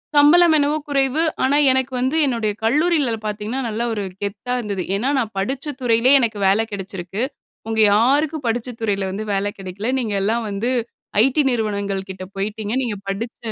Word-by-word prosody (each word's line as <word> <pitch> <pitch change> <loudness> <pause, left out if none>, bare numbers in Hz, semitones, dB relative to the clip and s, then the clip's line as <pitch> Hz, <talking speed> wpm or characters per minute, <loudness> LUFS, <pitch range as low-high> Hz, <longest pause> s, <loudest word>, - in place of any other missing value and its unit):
சம்பளம் 315 +3 +6
என்னவோ 295 +1 +2
குறைவு. 275 +1 +1 0.2
ஆனா, 275 +2 +3
எனக்கு 260 0 0
வந்து 260 +4 0
என்னுடைய 230 -6 0
கல்லூரிலியல 285 -1 +2
பார்த்தீங்கன்னா, 215 +5 -3
நல்ல 220 +2 -3
ஒரு 205 -2 -2 0.2
கெத்தா 205 +5 -3
இருந்தது. 200 -5 -3
ஏனா, 235 +7 0
நான் 225 -4 -2
படிச்ச 270 +8 -2
துறையிலே 235 +2 +3
எனக்கு 225 -4 -1
வேல 205 +3 +3
கெடச்சிருக்கு. 195 0 -5 0.5
உங்க 220 0 -1
யாருக்கும் 285 +6 +2
படிச்ச 230 +2 -1
துறையில 200 -3 0
வந்து 215 +3 -4
வேல 195 +1 0
கெடைக்கல. 195 +4 -5
நீங்கெல்லாம் 220 +1 -1
வந்து 205 +5 -1 0.5
ஐடி 270 +3 +3
நிறுவனங்கள் 200 -4 -2
கிட்ட 190 0 -7
போய்ட்டீங்க 210 +2 -3
நீங்க 235 -5 -2
படித்த 220 +5 -4
225 Hz, 155 wpm, -21 LUFS, 205-265 Hz, 0.5 s, சம்பளம்